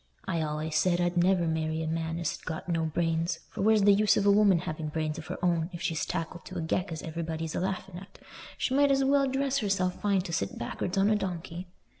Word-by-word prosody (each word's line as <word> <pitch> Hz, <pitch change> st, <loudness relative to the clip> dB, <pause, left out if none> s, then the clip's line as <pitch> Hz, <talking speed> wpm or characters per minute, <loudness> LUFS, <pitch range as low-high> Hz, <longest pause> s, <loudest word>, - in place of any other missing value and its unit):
I 170 Hz, -, -1 dB
allays 155 Hz, 0 st, -1 dB
said 175 Hz, +2 st, +2 dB
I'd 175 Hz, 0 st, +1 dB
never 175 Hz, 0 st, +3 dB
marry 160 Hz, 0 st, -1 dB
a -, -, -3 dB
man 165 Hz, 0 st, -2 dB
as 170 Hz, -2 st, -2 dB
had -, -, -15 dB
got 160 Hz, +2 st, -5 dB
no 165 Hz, -2 st, 0 dB
brains; 165 Hz, +1 st, 0 dB
for -, -, -5 dB
where's 215 Hz, 0 st, +4 dB
the 205 Hz, 0 st, +7 dB
use 210 Hz, +1 st, +4 dB
of 200 Hz, -, +1 dB
a 200 Hz, -, +6 dB
woman 200 Hz, -3 st, +5 dB
having 155 Hz, -1 st, -4 dB
brains 155 Hz, +1 st, -2 dB
of 160 Hz, -, -9 dB
her -, -, -4 dB
own 170 Hz, -1 st, +1 dB
if 170 Hz, -, -6 dB
she's 165 Hz, -3 st, -1 dB
tackled 165 Hz, +2 st, -4 dB
to 185 Hz, -, -7 dB
a -, -, -2 dB
geck 180 Hz, +3 st, -1 dB
as 160 Hz, -3 st, -5 dB
everybody's 160 Hz, -1 st, -4 dB
a -, -, -1 dB
laughing 190 Hz, -1 st, -3 dB
at? 195 Hz, -, -14 dB, 0.4 s
She 260 Hz, -, -1 dB
might 285 Hz, +1 st, +4 dB
as 275 Hz, 0 st, +3 dB
well 275 Hz, 0 st, +3 dB
dress 270 Hz, +1 st, 0 dB
herself 190 Hz, -4 st, 0 dB
fine 200 Hz, -2 st, +2 dB
to 175 Hz, -2 st, -6 dB
sit 100 Hz, -9 st, -2 dB
back'ards 175 Hz, +10 st, -3 dB
on 195 Hz, +2 st, +4 dB
a -, -, +4 dB
donkey." 180 Hz, -2 st, -4 dB
175 Hz, 245 wpm, -29 LUFS, 160-195 Hz, 0.4 s, the